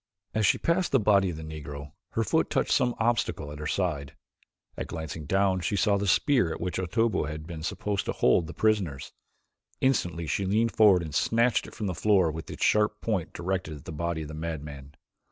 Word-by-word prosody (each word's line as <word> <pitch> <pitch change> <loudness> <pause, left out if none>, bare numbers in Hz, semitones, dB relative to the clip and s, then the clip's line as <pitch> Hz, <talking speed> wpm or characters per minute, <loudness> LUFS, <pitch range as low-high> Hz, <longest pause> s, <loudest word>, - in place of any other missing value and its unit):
As 110 -2 +2
she - - +4
passed 175 +2 0
the 135 - +4
body 100 -3 +3
of 80 - -5
the 80 - -7
Negro, 75 -2 -7 0.2
her - - +1
foot - - +1
touched - - 0
some 125 -1 +2
obstacle 110 -10 0
at 75 - -8
her 75 - -4
side, 75 -7 -2 0.6
and - - -5
glancing 80 -2 -6
down 95 0 +2
she 90 +4 -1
saw 100 +1 +3
the 100 0 -2
spear 125 - +3
with 80 - -4
which 90 +1 -3
Otobu 110 +2 +1
had 75 0 -6
been 80 -2 -7
supposed 100 +4 -2
to - - -1
hold 80 +6 +2
the - - -7
prisoners. 100 -11 0 0.7
Instantly 90 -11 +1
she 80 +6 -1
leaned 110 +4 +1
forward 100 -6 +5
and 80 -3 -7
snatched 115 +9 +2
it - - -12
from 110 - -4
the 95 - -1
floor 95 0 +3
with 80 +1 -7
its - - -2
sharp 105 0 +2
point 100 -7 -2
directed 90 -2 -3
at 70 - -15
the - - -6
body 85 +1 -2
of 75 - -8
the - - -7
madman. 75 -3 -6
90 Hz, 210 wpm, -27 LUFS, 80-105 Hz, 0.7 s, forward